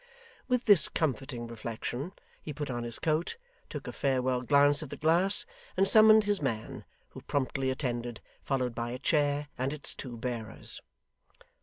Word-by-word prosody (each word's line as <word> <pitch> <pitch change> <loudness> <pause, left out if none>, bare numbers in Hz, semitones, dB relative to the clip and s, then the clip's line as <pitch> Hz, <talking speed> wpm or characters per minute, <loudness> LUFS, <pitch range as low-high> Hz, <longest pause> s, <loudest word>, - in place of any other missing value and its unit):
With 250 -1 0
this 205 -6 +9
comforting 135 -5 -2
reflection, 115 - -5 0.3
he 150 - -7
put 145 -1 -5
on 120 -1 -3
his 120 -1 -2
coat, 160 - -1 0.3
took - - -7
a - - -5
farewell 130 -2 0
glance 145 +2 +3
at 155 - -7
the - - -7
glass, 175 +6 +2 0.3
and 195 +1 +3
summoned 215 0 +7
his 205 -3 0
man, 115 -6 -4 0.2
who - - -11
promptly 135 -1 -1
attended, 120 -3 -3 0.2
followed 130 -3 -1
by 120 0 -4
a 125 - -5
chair 145 0 0
and 130 +2 -1
its 150 -1 -2
two 125 -3 -7
bearers. 115 -2 -4
135 Hz, 160 wpm, -29 LUFS, 120-155 Hz, 0.3 s, this